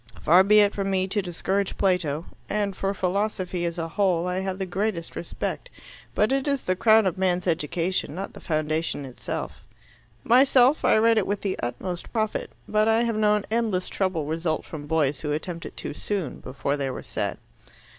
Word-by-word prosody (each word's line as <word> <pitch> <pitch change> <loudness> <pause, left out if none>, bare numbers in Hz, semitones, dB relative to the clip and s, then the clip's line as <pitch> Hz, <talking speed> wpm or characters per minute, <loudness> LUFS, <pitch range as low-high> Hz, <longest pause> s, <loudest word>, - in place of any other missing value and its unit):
"Far 180 +4 +7
be 210 +2 +6
it 205 0 +3
from 195 -1 -2
me 190 -1 +1
to 205 +1 0
disparage 190 +2 -2
Plato. 170 -5 +1 0.2
And 205 -2 -1
for 195 +1 -1
philosophy 185 -2 -1
as 170 0 -2
a 165 -1 -2
whole 180 -1 +1
I 180 +1 -1
have 190 -1 -3
the 190 - -2
greatest 185 -2 -2
respect. 175 - -4 0.5
But 210 +4 +3
it 270 +1 +1
is 280 -2 0
the 185 - 0
crown 220 +2 +5
of 185 0 0
a - - -8
man's 180 -1 +1
education, 170 0 -1
not 195 +2 -5
the - - -10
foundation. 155 -2 -1 1.2
Myself, 260 +3 +5
I - - +5
read 225 0 +4
it 200 - -2
with 205 0 -1
the 195 -2 -2
utmost 170 +9 -4
profit, 220 -2 -1 0.2
but 215 0 +2
I 225 +1 +4
have 230 -2 0
known 210 -1 +2
endless 220 -5 0
trouble 185 -6 -1
result 160 +1 -1
from 150 -2 -8
boys 150 -3 +1
who 150 -1 -2
attempt 170 +2 -4
it - - -13
too - - -4
soon, 190 -1 -3
before 140 +2 -3
they 135 -1 -2
were 130 - -6
set." - - -3
185 Hz, 190 wpm, -25 LUFS, 165-210 Hz, 1.2 s, Far